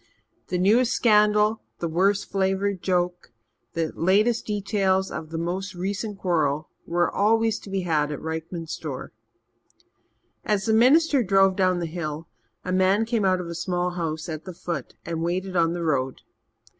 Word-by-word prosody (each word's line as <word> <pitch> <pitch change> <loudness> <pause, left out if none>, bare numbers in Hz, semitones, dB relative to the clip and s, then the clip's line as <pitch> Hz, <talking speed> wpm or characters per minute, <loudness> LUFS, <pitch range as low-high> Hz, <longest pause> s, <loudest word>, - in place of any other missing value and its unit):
The 180 - -1
newest 225 +7 +3
scandal, 210 -1 +3 0.2
the 170 - -2
worst 195 +5 +1
flavoured 195 0 0
joke, 180 -3 -1 0.4
the 165 -2 -1
latest 210 +7 +2
details 195 -2 0
of 155 - -6
the 165 - -5
most 185 +4 -3
recent 200 +3 -3
quarrel, 155 -5 0 0.2
were 175 +1 +1
always 225 +1 +2
to - - -12
be 195 0 -1
had 155 -4 0
at 150 - -4
Rykman's 160 +1 -5
store. 140 -5 -6 1.3
As 210 -2 0
the 220 - +2
minister 280 +5 +5
drove 195 -2 +4
down 185 -2 +2
the 175 - -2
hill, 160 -1 -5 0.4
a 185 - -2
man 190 +4 +3
came 225 -3 0
out 185 -1 +3
of - - -6
a 170 - -5
small 175 +1 -1
house 165 -2 -3
at 155 -2 -6
the 185 -2 -8
foot 170 -6 -5
and 165 -1 -3
waited 185 +3 -2
on 165 -1 +3
the 175 -1 -3
road. 135 -5 -1
185 Hz, 165 wpm, -25 LUFS, 165-205 Hz, 1.3 s, minister